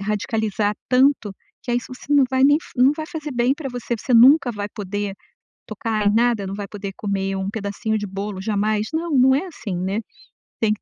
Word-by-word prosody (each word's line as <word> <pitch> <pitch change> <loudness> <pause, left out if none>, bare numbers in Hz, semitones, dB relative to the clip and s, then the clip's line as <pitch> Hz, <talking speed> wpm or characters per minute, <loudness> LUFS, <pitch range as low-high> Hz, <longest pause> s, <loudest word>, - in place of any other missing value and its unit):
radicalizar 210 0 -1
tanto, 255 -5 +3 0.3
que 245 - -5
aí 240 - +2
você 255 +3 -7
não 280 -2 +6
vai 260 0 +2
nem 290 +2 +6 0.2
não 255 +2 +6
vai 315 - -4
fazer 315 -3 -6
bem 245 +2 +2
pra 290 -2 -6
você, 245 -1 -3
você 255 - -3
nunca 255 +3 +7
vai 205 -3 -4
poder 205 -1 -4 0.5
tocar 215 -1 -2
em 205 - +4
nada, 230 -3 +2
não 195 - -4
vai 200 0 -6
poder 200 -1 -6
comer 195 -1 -2
um 190 +1 -2
pedacinho 215 +1 -2
de 205 - -4
bolo 195 0 -5
jamais? 210 +1 0
Não, 330 +1 -1
não 265 +1 +6
é 355 +8 0
assim, 215 - -6
né, 190 +4 -2 0.6
tem 215 -1 +2
que 210 - -9
220 Hz, 205 wpm, -22 LUFS, 205-255 Hz, 0.6 s, nunca